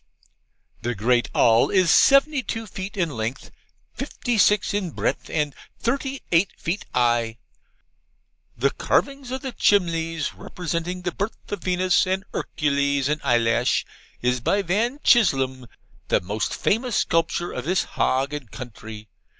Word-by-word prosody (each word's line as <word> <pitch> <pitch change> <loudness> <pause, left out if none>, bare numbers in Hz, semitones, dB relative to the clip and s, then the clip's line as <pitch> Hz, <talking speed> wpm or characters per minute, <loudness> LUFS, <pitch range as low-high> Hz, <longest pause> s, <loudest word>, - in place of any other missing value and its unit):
'The 120 +1 -2
great 120 +4 +1
all 115 0 +4
is 185 -4 +3
seventy 275 +1 +5
two 225 -2 -4
feet 195 -1 -7
in 170 -3 +1
lenth, 115 +1 -4 0.4
fifty 245 -2 -3
six 210 0 +3
in 200 -3 -1
breath, - - -2
and 150 -2 -1 0.2
thirty 270 +3 -2
eight 175 +2 +4
feet 175 +5 -3
'igh. 120 -2 +2 1.2
The 135 +4 +2
carvings 275 -2 0
of 260 +1 -4
the 265 - -3
chimlies, 165 -8 +1
representing 180 +1 -4
the 180 - -1
birth 200 +5 -5
of 205 -3 -3
Venus, 185 +1 +2
and 190 +1 -1
Ercules, 140 -2 0
and 150 0 -1
Eyelash, 120 -2 +2 0.4
is 125 0 +1
by 200 - +1
Van 220 +10 0
Chislum, 135 - +3 0.4
the - - +3
most 105 +4 -3
famous 235 +1 0
sculpture 165 +1 0
of - - -5
his 180 +2 +1
hage 135 +3 0
and 145 -6 -6
country. 110 -3 -9
165 Hz, 140 wpm, -23 LUFS, 125-205 Hz, 1.2 s, seventy